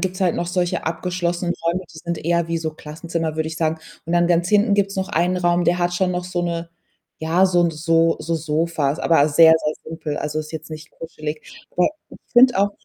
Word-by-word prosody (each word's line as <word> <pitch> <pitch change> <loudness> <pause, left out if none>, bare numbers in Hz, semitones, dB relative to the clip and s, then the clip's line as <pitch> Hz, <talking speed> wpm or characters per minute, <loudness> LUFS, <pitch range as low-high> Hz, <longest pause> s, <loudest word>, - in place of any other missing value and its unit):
gibt's 185 0 -3
halt 180 -3 +2
noch 175 - -2
solche 175 0 -1
abgeschlossenen 175 +1 -2
Räume, 180 +3 0
die - - -10
sind 170 +1 -4
eher 170 0 +1
wie 165 0 -1
so 160 -1 -3
Klassenzimmer, 160 +1 -4
würde 160 0 -1
ich 160 - -7
sagen. 160 -1 0 0.3
Und 170 - -4
dann 175 0 +3
ganz 175 0 +2
hinten 210 0 +3
gibt's 200 -1 0
noch 190 0 -2
einen 180 -2 +1
Raum, 175 0 +2
der 175 +2 +2
hat 175 0 0
schon 180 0 +1
noch 180 0 -3
so 175 -1 -3
'ne 170 -1 -3 0.5
ja, 170 +4 +3
so 175 -1 +3
'n 170 - +2
so 165 +1 +2
so 165 +2 -3
Sofas, 155 -1 -1
aber 155 -3 +3
sehr, 160 +2 +7
sehr 155 -1 -2
simpel. 155 -2 -5
Also, 150 +1 -3
ist 155 +1 -6
jetzt 160 0 -7
nicht 155 +1 -9
kuschelig. 155 -2 -7 0.3
Aber 180 - +2 0.2
ich - - -13
finde 245 -3 +6
auch 200 +1 +3
170 Hz, 225 wpm, -21 LUFS, 160-180 Hz, 0.5 s, sehr